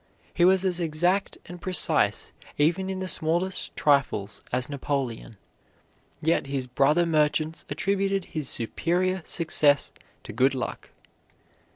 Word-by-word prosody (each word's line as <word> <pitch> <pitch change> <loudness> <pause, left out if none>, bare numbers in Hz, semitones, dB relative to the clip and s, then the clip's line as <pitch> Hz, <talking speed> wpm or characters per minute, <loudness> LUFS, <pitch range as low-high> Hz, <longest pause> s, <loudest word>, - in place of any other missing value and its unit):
He 175 - +1
was 190 +1 +4
as 180 -2 +1
exact 175 +4 0
and 175 0 -11
precise 185 -1 +2 0.2
even 175 +6 +1
in 190 0 -4
the 185 - -3
smallest 175 +3 +1
trifles 120 -8 0
as 125 0 0
Napoleon; 135 -6 -4 0.9
yet 160 -3 +1
his 135 -2 -2
brother 140 +7 +2
merchants 155 0 0
attributed 195 -1 -1
his 155 -4 -1
superior 180 +10 0
success 150 -4 +2 0.3
to - - -9
good 130 +4 +2
luck. 125 - -5
160 Hz, 125 wpm, -25 LUFS, 140-185 Hz, 0.9 s, was